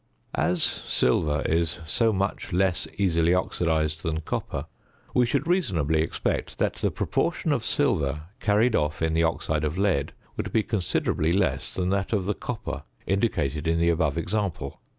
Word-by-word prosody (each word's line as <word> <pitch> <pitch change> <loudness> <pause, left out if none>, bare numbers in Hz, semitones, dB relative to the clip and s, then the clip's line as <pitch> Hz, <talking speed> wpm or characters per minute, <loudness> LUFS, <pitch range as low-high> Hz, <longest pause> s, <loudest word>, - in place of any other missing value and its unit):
As 90 -1 +1
silver 75 -1 +1
is 80 0 +1
so 110 +9 +2
much 100 0 -2
less 90 -2 +1
easily 85 -3 +3
oxidised 80 -4 0
than 80 -1 -2
copper, - - -3 0.5
we 125 -1 +4
should 140 +4 0
reasonably 90 - +1
expect 80 - -2
that - - +1
the - - +1
proportion - - 0
of - - +1
silver 75 +1 +1 0.2
carried 110 +3 +3
off 75 +2 0
in 80 -1 +1
the 80 - +3
oxide 80 -2 0
of 75 +3 -1
lead 95 -8 +1 0.2
would - - -3
be 110 - +2
considerably 90 -6 0
less 80 -8 +1
than 90 -1 0
that 100 +2 0
of 100 -4 +1
the 105 - +1
copper - - -5 0.2
indicated 85 - 0
in 85 0 +2
the 85 0 +3
above 80 -2 +1
example. 90 -6 -2
85 Hz, 160 wpm, -26 LUFS, 80-100 Hz, 0.5 s, we